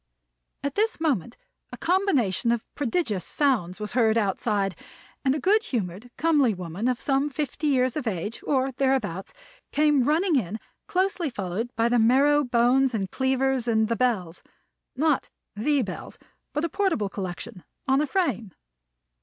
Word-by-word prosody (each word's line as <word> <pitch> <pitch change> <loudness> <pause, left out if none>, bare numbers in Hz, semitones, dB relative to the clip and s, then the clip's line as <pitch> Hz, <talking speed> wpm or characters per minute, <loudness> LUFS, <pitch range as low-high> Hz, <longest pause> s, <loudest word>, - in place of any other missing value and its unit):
At 280 -1 -2
this 435 +1 0
moment 255 - -1 0.3
a - - -7
combination 285 - +1
of 235 -2 -1
prodigious 235 - -1
sounds 215 - 0
was 210 0 -4
heard 225 -3 +3
outside, 200 -2 0 0.5
and 265 0 +2
a - - -2
good 410 +9 +3
humored, 215 - -4
comely 290 -9 +3
woman 180 +5 -4
of 250 -1 0
some 275 +1 +1
fifty 300 +1 -3
years 255 -3 +2
of 295 -6 -3
age, 205 +2 -3
or 270 -1 +1
thereabouts, 255 -9 -1 0.4
came 295 -2 +3
running 315 +5 +2
in, 215 -2 -2 0.3
closely 370 -3 0
followed 205 +1 -3
by 230 +1 +2
the 240 0 +3
marrow 280 +6 +4
bones 250 +1 +3
and 195 -3 -2
cleavers 265 -1 0
and 220 -1 +2
the 230 - +1
bells 210 -9 -1 0.5
not 300 +1 +1 0.3
the 275 +6 +1
Bells, 190 -4 -7 0.3
but 300 +2 -1
a - - -2
portable 370 - 0
collection 190 +1 -6 0.2
on 270 +1 +3
a 300 - 0
frame. 240 - -1
250 Hz, 155 wpm, -25 LUFS, 215-290 Hz, 0.5 s, marrow